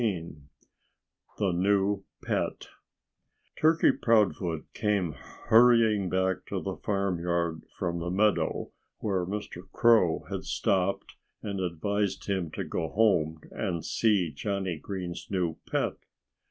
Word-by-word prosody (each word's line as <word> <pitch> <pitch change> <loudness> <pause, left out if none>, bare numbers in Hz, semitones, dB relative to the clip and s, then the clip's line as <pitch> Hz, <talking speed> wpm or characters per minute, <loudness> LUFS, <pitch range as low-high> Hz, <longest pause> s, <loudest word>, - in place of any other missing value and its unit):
XIII 90 -8 -2 1.0
THE 100 -3 +1
NEW 95 +2 +1 0.2
PET - - -2 0.9
Turkey 160 +1 +5
Proudfoot 90 -8 +1
came 100 -6 0
hurrying 110 +2 +3
back 95 -1 +1
to - - -2
the - - -4
farmyard 85 -4 -1 0.2
from 85 -1 -2
the 85 +1 -3
meadow 105 +3 +1 0.3
where 95 -4 -1
Mr. 95 -2 -6
Crow 110 -9 +4
had - - -3
stopped 95 0 0 0.3
and 100 -2 -3
advised 100 +3 -1
him 95 -5 -1
to - - -4
go - - -3
home 85 -7 +2
and 85 -4 -3
see 100 -8 +2
Johnnie 95 +2 -3
Green's 90 -1 -6
new 90 -5 -1
pet. - - 0
95 Hz, 115 wpm, -28 LUFS, 85-105 Hz, 1.0 s, Turkey